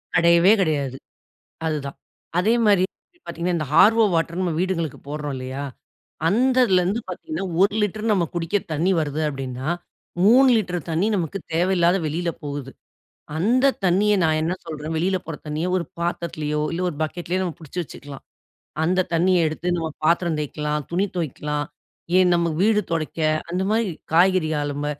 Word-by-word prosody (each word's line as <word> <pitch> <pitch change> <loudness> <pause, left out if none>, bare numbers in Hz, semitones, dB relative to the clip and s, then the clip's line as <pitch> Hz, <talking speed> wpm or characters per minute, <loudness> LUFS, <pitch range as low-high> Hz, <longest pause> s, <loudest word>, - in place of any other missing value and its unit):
கடையவே 170 +4 +6
கடையாது, 140 -6 -1 0.7
அதுதான். 145 -3 -3 0.4
அதே 215 +6 +3
மாரி 195 -3 +5
இப்ப 350 0 -38
பார்த்தீங்கன்னா, 170 +1 -2
இந்த 155 - -3
ஹார்வோ 225 +5 +6
வாட்டர் 165 +2 0
நம்ம 175 -3 0
வீடுங்களுக்கு 170 -5 -2
போடுறோம் 145 -1 -4
இல்லையா? 130 +2 -5 0.6
அந்ததுலேருந்து 230 -4 +3
பார்த்தீங்கன்னா, 255 - -5 0.2
1 200 +1 +3
லிட்டர் 215 +2 -1
நம்ம 175 -4 +2
குடிக்க 170 +4 0
தண்ணி 170 +5 +1
வருது 150 0 -2
அப்டின்னா, 135 0 -5 0.6
3 260 +5 +7
லிட்டர் 180 -4 -2
தண்ணி 170 +6 +1
நமக்கு 180 +2 -2 0.2
தேவையில்லாத 175 +1 +3
வெளில 170 +3 -2
போகுது. 140 -2 -5 0.7
அந்த 255 +9 +3
தண்ணிய 200 +4 +3
நான் 155 -1 +2
என்ன 170 +3 0
சொல்றேன் 155 0 -5
வெளில 185 +3 +1
போற 165 -2 -5
தண்ணிய 155 +4 -2
ஒரு 170 - -2
பாத்திரத்திலேயோ, 155 -3 -2
இல்ல 170 +2 -3
ஒரு 150 - -7
பக்கெட்லயோ 175 +3 -3
நம்ம 175 -3 -3
புடிச்சு 165 +3 -7
வச்சுக்கலாம். 140 -2 -11 0.6
அந்த 185 +2 +2
தண்ணீய 175 -1 +3
எடுத்து 165 +3 -4
நம்ம 165 -1 -2 0.2
பாத்திரம் 170 -1 +2
தேய்க்கலாம், 150 0 -3
துணி 185 +4 +1
தொவைக்கலாம், 150 -2 -2 0.5
ஏன்? 180 -1 +5
நமக்கு 170 -2 0
வீடு 215 -1 +4
தொடைக்க, 160 0 -2 0.3
அந்த 180 +2 -1
மாரி 225 0 +2 0.3
காய்கறி 180 -2 +4
அலும்ப 145 0 -3
170 Hz, 150 wpm, -23 LUFS, 155-190 Hz, 0.7 s, 3